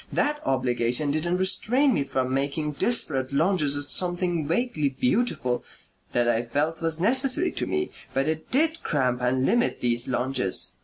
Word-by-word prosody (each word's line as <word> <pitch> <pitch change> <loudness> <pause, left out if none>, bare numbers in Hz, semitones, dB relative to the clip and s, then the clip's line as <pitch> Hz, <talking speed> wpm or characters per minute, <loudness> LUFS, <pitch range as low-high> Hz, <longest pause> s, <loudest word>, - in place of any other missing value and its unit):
That 295 0 0
obligation 130 +1 +1
didn't 170 +4 0
restrain 245 +9 +2
me 140 - +1
from 130 -1 -2
making 140 +3 -1
desperate 140 - 0
lunges 150 -1 +2
at 145 - -1
something 175 -1 0
vaguely 165 - 0
beautiful 130 - -1 0.5
that 120 -1 +2
I 115 -1 +2
felt 145 +8 -2
was 165 -1 0
necessary 265 - +2
to - - -3
me; 370 0 -2 0.2
but 135 +2 0
it 160 0 -3
did 320 +4 +1
cramp 125 -4 0
and 130 +1 +1
limit 240 - +1
these 120 -1 +1
lunges. 125 -6 -1
150 Hz, 155 wpm, -25 LUFS, 130-195 Hz, 0.5 s, restrain